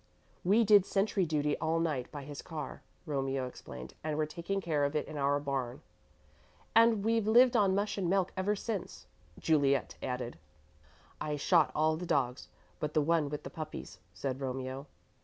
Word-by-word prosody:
"We 205 +6 +5
did 205 -2 +7
sentry 195 -2 +1
duty 150 -1 +1
all 160 +1 +1
night 150 -7 -1
by 145 -2 -6
his 145 0 -7
car," 155 -5 -6 0.2
Romeo 135 -3 -1
explained, 65 - -9
"and 155 -1 -2
we're 155 - +2
taking 170 +5 -3
care 155 -6 0
of 140 +2 0
it 150 - 0
in 155 - -8
our 145 0 +2
barn." 135 -2 -3 0.9
"And 225 -2 +5
we've 225 -1 +2
lived 245 +3 +6
on 195 -4 +4
mush 205 +1 -1
and 180 -3 0
milk 190 -1 +1
ever 195 +3 +1
since," 205 -2 -5 0.3
Juliet 140 -4 +2
added. 125 -7 -4 0.8
"I 150 -1 -1
shot 155 +2 +3
all 155 +1 +2
the 175 +1 -5
dogs 130 -3 0 0.3
but 150 -1 -3
the 155 - +5
one 160 -1 +2
with 150 0 -5
the - - -7
puppies," 155 -1 -7
said 130 +9 -4
Romeo. 130 +1 -4
155 Hz, 175 wpm, -32 LUFS, 140-190 Hz, 0.9 s, did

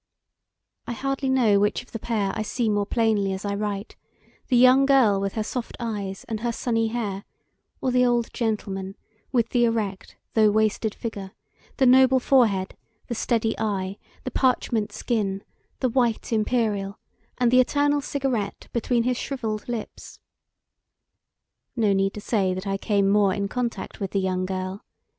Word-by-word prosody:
I 240 - -2
hardly 275 +2 -2
know 235 -6 +4
which 205 +4 +1
of 245 - -23
the 225 - -5
pair 210 -4 -1
I 220 - -2
see 225 +1 -1
more 205 -1 0
plainly 215 -5 +1
as 190 +2 -5
I 200 - -1
write 205 0 -4 0.5
the 250 - +3
young 255 +2 +6
girl 235 -8 +4
with 195 0 -2
her 220 - -1
soft 240 +2 -5
eyes 205 -5 -4
and 220 -2 -4
her 240 +1 -1
sunny 225 -1 0
hair, 210 -4 -3 0.6
or 260 - 0
the 250 0 +4
old 240 -2 +1
gentleman 195 -4 -3 0.4
with 240 -4 +1
the 240 -1 +2
erect 215 -4 -2 0.2
though 215 -1 +5
wasted 215 0 +1
figure, 200 -4 -6 0.4
the 265 - +4
noble 260 +1 +6
forehead, 220 -8 +2 0.3
the - - -1
steady 225 -1 0
eye, 200 -2 -2 0.2
the 255 - -4
parchment 230 -5 +1
skin, 205 -4 -2 0.4
the 255 - +2
white 235 -2 0
imperial, 215 -3 0 0.4
and 245 -2 +2
the 255 - +6
eternal 290 +3 +2
cigarette 265 -8 -3
between 235 0 +1
his 250 0 0
shrivelled 225 -6 -4
lips. 235 -3 -6 1.6
No 215 -5 +2
need 195 0 +1
to 210 - -6
say 195 -4 0
that 185 +2 -5
I 195 0 -1
came 200 -1 +1
more 200 -1 +3
in 200 -1 -1
contact 240 +2 -4
with 195 -2 -3
the 200 - +2
young 185 -1 -1
girl. 185 +1 -4
220 Hz, 165 wpm, -24 LUFS, 200-245 Hz, 1.6 s, young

